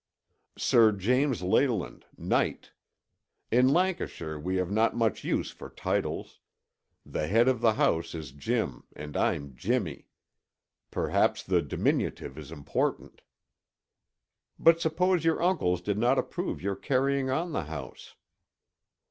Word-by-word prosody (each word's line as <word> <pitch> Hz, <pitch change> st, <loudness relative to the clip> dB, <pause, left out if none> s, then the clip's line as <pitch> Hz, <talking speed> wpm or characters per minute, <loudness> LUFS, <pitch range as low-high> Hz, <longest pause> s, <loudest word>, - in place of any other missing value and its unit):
"Sir 115 Hz, -2 st, +5 dB
James 125 Hz, +4 st, +1 dB
Leyland, 110 Hz, +2 st, 0 dB
knight. -, -, -1 dB, 0.8 s
In 125 Hz, +2 st, +5 dB
Lancashire 145 Hz, -, -1 dB
we 90 Hz, +5 st, -2 dB
have 90 Hz, 0 st, -1 dB
not 110 Hz, +3 st, +2 dB
much 115 Hz, -3 st, 0 dB
use -, -, -1 dB
for -, -, -10 dB
titles; -, -, -3 dB, 0.7 s
the 75 Hz, -, -3 dB
head 115 Hz, +7 st, +4 dB
of 130 Hz, -3 st, +2 dB
the 115 Hz, -2 st, +4 dB
house 85 Hz, -5 st, 0 dB
is 80 Hz, -5 st, -7 dB
Jim 70 Hz, 0 st, -2 dB
and 75 Hz, 0 st, -8 dB
I'm 70 Hz, -2 st, -1 dB
Jimmy. -, -, -2 dB, 0.8 s
Perhaps -, -, +1 dB
the -, -, +2 dB
diminutive 65 Hz, -, -1 dB
is 75 Hz, -1 st, -10 dB
important." 75 Hz, -4 st, -3 dB, 1.4 s
"But 165 Hz, 0 st, +5 dB
suppose 175 Hz, +2 st, +1 dB
your 165 Hz, 0 st, +2 dB
uncles 145 Hz, -, +1 dB
did 100 Hz, +3 st, -2 dB
not 125 Hz, +4 st, +3 dB
approve 180 Hz, -, -3 dB
your 100 Hz, 0 st, -1 dB
carrying 135 Hz, +2 st, 0 dB
on 165 Hz, +6 st, -1 dB
the 95 Hz, -, -2 dB
house?" 80 Hz, 0 st, -8 dB
115 Hz, 125 wpm, -28 LUFS, 85-140 Hz, 1.4 s, Sir